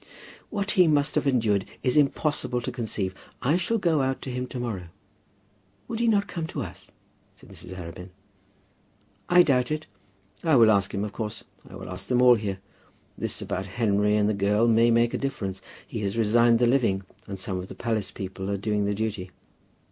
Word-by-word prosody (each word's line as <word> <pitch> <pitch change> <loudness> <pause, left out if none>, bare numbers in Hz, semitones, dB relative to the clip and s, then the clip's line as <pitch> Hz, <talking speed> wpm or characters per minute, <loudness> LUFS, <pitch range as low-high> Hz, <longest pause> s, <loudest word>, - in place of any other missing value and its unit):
"What 205 -1 -2
he 180 -4 +5
must 145 -2 +2
have - - 0
endured 110 -7 +2
it - - -15
is 125 - +2
impossible 145 -3 +2
to - - -4
conceive. 110 -6 -3 0.3
I 135 +5 +2
shall 185 +6 +1
go 170 -7 +2
out 130 0 -1
to 130 - -4
him 125 +1 -3
to 125 - -6
morrow." 105 -8 -4 1.0
"Would 225 - -4
he 235 - +2
not 205 -3 +3
come 165 -2 -4
to 145 -4 -4
us?" 90 - -10 0.5
said - - -17
Mrs. 95 - -10
Arabin. 90 +1 -8 1.2
"I 180 0 +7
doubt 125 -5 +2
it. 155 0 -2 0.6
I 160 -3 +4
will 115 -3 +7
ask 100 -2 +2
him, 100 +1 -2
of 105 - -7
course. 110 -2 -5 0.3
I - - -11
will - - -8
ask 95 +1 -7
them 125 -1 +2
all 125 0 +8
here. 105 -4 -2 0.6
This - - -3
about 95 +1 -3
Henry 105 -2 +2
and 105 -1 +3
the 110 - +2
girl 105 +3 +2
may 115 +1 +5
make 115 0 +3
a - - -1
difference. 100 -9 -3 0.2
He - - -6
has 100 +1 -2
resigned 115 +1 +4
the 120 - +3
living, 120 -6 +2 0.2
and 100 - -5
some 95 0 -3
of 90 - -6
the - - -10
palace 110 -4 -1
people 95 0 -6
are 100 - 0
doing 105 0 0
the 100 0 0
duty." 105 -3 -3
115 Hz, 200 wpm, -26 LUFS, 100-135 Hz, 1.2 s, all